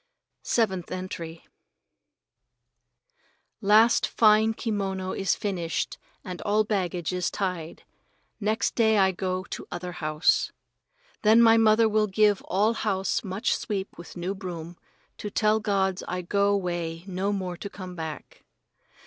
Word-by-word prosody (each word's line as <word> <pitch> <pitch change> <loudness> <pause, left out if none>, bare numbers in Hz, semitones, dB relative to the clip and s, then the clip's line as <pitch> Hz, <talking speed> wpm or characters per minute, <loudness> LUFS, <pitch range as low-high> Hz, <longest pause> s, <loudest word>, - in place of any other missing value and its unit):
Seventh 190 -7 0
Entry 170 -3 -6 2.2
Last 215 +3 +5
fine 220 0 +4
kimono 195 -5 -2
is 195 - 0
finished 175 -5 -3 0.2
and 180 -1 -7
all 210 +1 +2
baggage 185 -5 -2
is 180 -1 0
tied. 180 -5 -4 0.6
Next 215 +1 0
day 220 -2 +3
I 190 -1 +4
go 185 0 -2
to - - -6
other 180 0 -5
house. 155 -3 +1 0.7
Then 220 +2 +6
my 230 -1 +7
mother 225 0 +5
will 215 0 +2
give 205 0 +3
all 210 +4 +2
house 195 -3 -1
much 195 +1 -1
sweep 195 -2 -4
with 170 +1 -11
new 180 +3 -2
broom, 175 -3 -7 0.4
to 210 - -4
tell 215 +1 +2
gods 195 -3 0
I 180 0 -3
go 200 +2 +2
'way 175 -3 -3
no 195 +1 -2
more 185 -3 -3
to 200 - -6
come 185 -2 -8
back. 160 -2 -7
190 Hz, 130 wpm, -26 LUFS, 180-210 Hz, 2.2 s, my